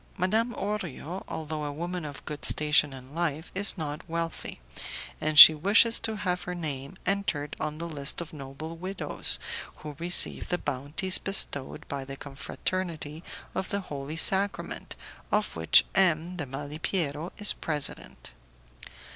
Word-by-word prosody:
Madame 220 +6 0
Orio, 190 -4 -5
although 155 -1 -5
a 145 - -4
woman 175 +3 -5
of 145 -2 -9
good 150 -1 -7
station 150 -1 +3
in 130 +1 -12
life, 160 -1 -3
is 200 +2 +2
not 150 -2 -5
wealthy, 165 0 -4 0.6
and 155 -1 -2
she 160 - +14
wishes 205 +8 +4
to 220 -1 -2
have 180 -3 -2
her 180 - -6
name 150 0 -6
entered 180 -7 -2
on 155 0 -4
the 170 +1 -5
list 145 -3 -1
of 170 0 -6
noble 150 +3 -8
widows 185 +3 +4 0.4
who 150 -1 -10
receive 175 +1 +3
the 180 - 0
bounties 145 +7 -1
bestowed 145 -8 0
by 140 -1 -5
the 135 +1 -9
Confraternity 155 +3 -5 0.3
of 190 - -4
the 200 - -2
Holy 145 -2 -7
Sacrament, 195 +4 0 0.4
of 210 -1 0
which 80 0 +5
M. 175 -2 +1
de 150 -6 -5
Malipiero 150 +3 -4
is 210 -1 +7
president. 150 - -4
160 Hz, 145 wpm, -27 LUFS, 145-185 Hz, 0.6 s, she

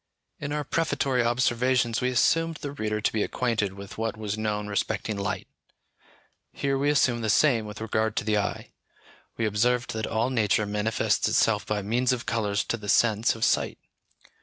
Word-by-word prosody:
In 140 - -4
our 150 0 -1
prefatory 140 -5 0
observations 120 0 +1
we 125 - +1
assumed 165 +6 +2
the 145 -2 -6
reader 105 -6 -2
to - - 0
be 110 - 0
acquainted 110 -4 -1
with 100 +1 -10
what 110 -1 -2
was 105 -1 -3
known 105 -1 -2
respecting 105 +1 -2
light; 100 -1 -3 1.0
here 135 -1 -1
we 140 +2 +1
assume 130 -5 +2
the 110 - -1
same 115 -3 +3
with 105 -1 -8
regard 110 0 -1
to - - 0
the 105 0 +1
eye. 100 - -4 0.7
We 115 - 0
observed 120 +4 +1
that 110 -1 -3
all 115 +3 0
nature 110 -3 +2
manifests 105 +2 0
itself 105 -2 +2
by 105 -1 -1
means 120 +5 +1
of 120 - -4
colours 105 -3 0
to 115 - -2
the 105 -2 -7
sense 115 +1 +3
of 115 - 0
sight. - - +1
115 Hz, 180 wpm, -26 LUFS, 105-125 Hz, 1.0 s, same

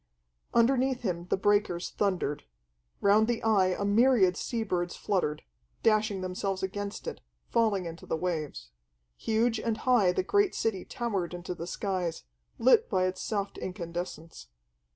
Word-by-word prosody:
Underneath 255 +2 +3
him 175 -4 -2
the - - +1
breakers 200 -3 +1
thundered: 185 -8 -1 0.6
round 210 +2 +5
the 240 -1 -1
Eye 210 -4 +4
a 185 +2 -1
myriad 205 -3 +4
sea 230 +3 -2
birds 175 -4 -2
fluttered, 180 -7 -1 0.4
dashing 215 -3 +2
themselves 185 +1 -3
against 200 +1 -4
it, - - -5 0.3
falling 215 -5 +2
into 165 0 -8
the - - -1
waves. 155 - -3 0.4
Huge 225 - +1
and 225 -1 -1
high 235 -8 +3
the 185 - 0
great 405 - +2
city 195 -5 -1
towered 195 -8 -3
into 175 +1 -5
the 170 0 -7
skies, 185 -3 -2 0.3
lit 260 - +4
by 185 -3 +2
its 185 0 -2
soft 200 -2 -3
incandescence. 170 - -6
195 Hz, 145 wpm, -29 LUFS, 180-225 Hz, 0.6 s, round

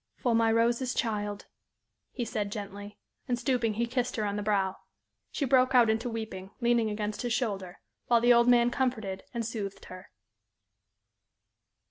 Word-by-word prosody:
"For 245 -3 0
my 225 0 +3
Rose's 235 +3 +1
child," 205 -2 -2 0.7
he 245 - -3
said, 210 -4 -3
gently, 205 0 -7 0.3
and, 245 -2 0
stooping, 240 -4 0
he 235 +2 0
kissed 250 +1 -2
her 215 - -1
on 200 0 -2
the 210 - -2
brow. 195 -2 0 0.5
She 285 - -2
broke 255 0 +3
out 235 -3 +6
into 225 +3 -1
weeping, 220 -5 -6
leaning 235 -2 +2
against 210 0 -3
his 240 -2 -1
shoulder, 195 -7 -2 0.3
while 235 -1 +5
the 240 +1 +5
old 235 0 +4
man 245 -1 +5
comforted 220 -8 -2
and 235 -1 -3
soothed 200 -3 -5
her. 185 0 -11
225 Hz, 160 wpm, -29 LUFS, 205-240 Hz, 0.7 s, out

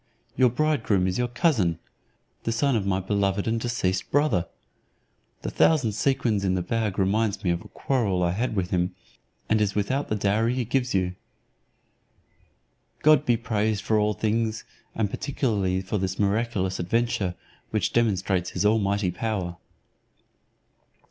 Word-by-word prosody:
Your 130 -1 +5
bridegroom 120 -8 +1
is 95 +4 -1
your 125 - +1
cousin, 120 - +1 0.6
the 115 - -2
son 135 +3 +1
of 100 -3 -1
my 95 -1 +1
beloved 100 +1 0
and 115 +1 +1
deceased 105 -6 -1
brother. 135 - +2 1.0
The - - -3
thousand 140 -9 +3
sequins 115 -2 0
in 95 -1 +1
the 90 - -1
bag 110 0 -1
reminds 100 +2 +1
me 90 - +2
of 85 0 -1
a - - -12
quarrel 105 -9 0
I 85 - +2
had 110 +5 -2
with 90 -3 -1
him, 90 0 0 0.5
and 110 -1 +2
is 105 -1 0
without 130 +8 0
the 110 - -1
dowry 110 +4 +1
he 125 -2 -1
gives 125 -1 0
you. 90 -1 +1 1.9
God 150 -2 +5
be 120 -1 +4
praised 110 -2 -1
for 110 0 +2
all 105 0 +1
things, 110 +1 -1 0.3
and 110 -2 +1
particularly 100 -7 -1
for 95 +2 -2
this 95 0 -2
miraculous 100 -2 0
adventure, 95 -1 0 0.3
which - - -1
demonstrates 95 -5 +1
his - - -2
almighty 100 -3 +2
power." 90 -4 -3
105 Hz, 150 wpm, -25 LUFS, 95-120 Hz, 1.9 s, Your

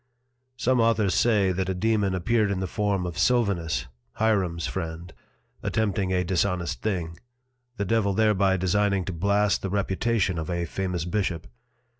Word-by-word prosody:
Some 125 +1 +2
Authors 115 -4 +2
say, 105 -5 +3
that 95 +1 -2
a 95 - -1
Dæmon 105 -1 +1
appeared 110 +3 +1
in 100 -2 -1
the 95 - -1
form 100 0 -1
of 85 -1 -5
Sylvanus 85 - +1 0.3
(Hierom's 95 -7 +1
Friend) 85 -1 -5 0.5
attempting 100 -4 0
a 90 -1 +1
dishonest 90 -1 -1
thing, 85 -6 -3 0.6
the 100 - -1
Devil 100 -1 +1
thereby 100 -3 +3
designing 100 +1 +1
to 95 - -4
blast 100 +4 +1
the 95 - -3
Reputation 100 -1 0
of 80 - -5
a 85 -1 -1
famous 90 0 -3
Bishop. 90 -3 -2
95 Hz, 150 wpm, -26 LUFS, 90-105 Hz, 0.6 s, say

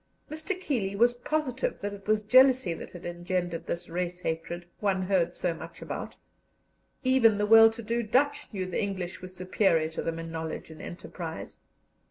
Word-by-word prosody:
Mr. 315 +5 -3
Keeley 220 - -1
was 240 +4 +4
positive 260 0 -2
that 205 0 -4
it 200 0 -11
was 215 0 +2
jealousy 255 -3 +5
that - - -8
had 175 - -11
engendered 175 0 -3
this 175 +1 -3
race 175 +1 -3
hatred 170 +1 -3
one 195 -2 +1
heard 180 -2 +1
so 175 -2 0
much 165 - -10
about; - - -6 0.9
even 255 -5 +5
the 210 - +1
well 225 +1 +9
to 225 +1 -8
do 235 +2 0
Dutch 260 +7 +1
knew 190 -4 -3
the 185 - -2
English 185 -3 -4
were 185 - -6
superior 185 -3 +1
to - - -4
them 165 0 -3
in 165 0 -6
knowledge 160 0 -5
and 155 - -11
enterprise. 170 -1 -7
190 Hz, 180 wpm, -28 LUFS, 175-230 Hz, 0.9 s, well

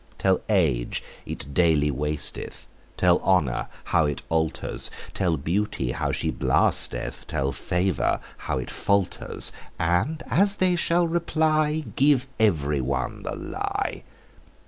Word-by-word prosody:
Tell 95 -1 +2
age 75 - +1 0.2
it 70 - -6
daily 75 -3 +3
wasteth; 75 0 0 0.3
Tell 90 -1 +4
honour 70 -11 +1 0.2
how 80 -3 +2
it 75 - -4
alters; 80 -1 +1 0.2
Tell 85 -4 0
beauty 80 - -1
how - - -1
she - - -1
blasteth; - - +1
Tell 70 0 -1
favour 90 +3 0 0.3
how - - +1
it 65 - -4
falters: 100 -2 0 0.3
And 90 - 0
as 200 +2 +3
they 185 -2 +2
shall 175 0 +3
reply, 155 -2 +1
Give 135 -2 +3
every 75 -10 +2
one 65 -1 -2
the - - -4
lie. - - -3
90 Hz, 125 wpm, -25 LUFS, -, 0.3 s, Tell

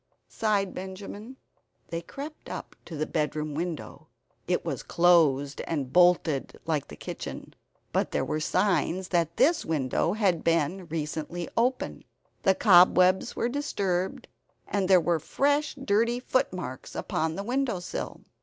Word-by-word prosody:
sighed 205 -3 0
Benjamin. 200 +6 -8 0.5
They 165 0 -3
crept 285 - -9
up - - -7
to 160 - -7
the 155 - 0
bedroom 155 -1 -2
window. 165 +1 -5 0.4
It - - 0
was - - -3
closed 150 -5 +3
and 140 -6 -3
bolted 175 -5 +3
like 155 -4 -1
the - - -10
kitchen. - - -7 0.4
But - - +1
there - - -1
were 155 - -1
signs 185 +1 +1
that 170 -2 0
this 330 +3 +4
window 155 +2 0
had 195 -6 +1
been 170 +2 +1
recently 160 +2 -4
open; 250 +2 0 0.4
the 190 - +4
cobwebs 185 -2 +5
were - - 0
disturbed, 200 -9 -2 0.4
and 200 -2 0
there 185 -1 +7
were 170 -1 +1
fresh 285 - +1
dirty 235 -2 +1
footmarks 185 - -2
upon 160 0 -1
the 200 - -4
windowsill. 240 -6 -2
180 Hz, 135 wpm, -27 LUFS, 160-205 Hz, 0.5 s, there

